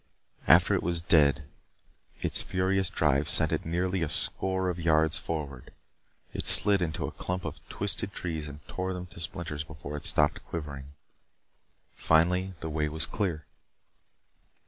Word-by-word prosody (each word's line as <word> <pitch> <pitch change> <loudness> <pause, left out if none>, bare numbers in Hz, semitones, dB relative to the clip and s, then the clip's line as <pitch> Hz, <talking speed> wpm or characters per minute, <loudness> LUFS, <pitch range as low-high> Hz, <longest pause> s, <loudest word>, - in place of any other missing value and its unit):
After - - +6
it - - +1
was 85 -1 +1
dead 75 -3 +4 0.8
its - - +1
furious 95 0 0
drive 75 -1 +1
sent - - +3
it - - -2
nearly 90 +2 -1
a 80 - 0
score 95 +3 -1
of 90 -1 -2
yards 80 -1 +2
forward. 70 -6 -5 0.6
It - - -3
slid 100 -2 +4
into 80 -2 -2
a - - -5
clump 90 0 -4
of 75 -2 -6
twisted 100 +1 -1
trees 80 -5 -4
and 75 0 -11
tore 95 0 -3
them 90 0 -6
to 85 -1 -13
splinters 85 -4 -4
before 75 -1 -8
it 75 - -6
stopped 75 -1 +3
quivering. 70 -4 -6 1.0
Finally 90 +4 +2
the 80 - -4
way 75 0 0
was 80 +2 -2
clear. 85 -8 -3
80 Hz, 150 wpm, -28 LUFS, 75-90 Hz, 1.0 s, After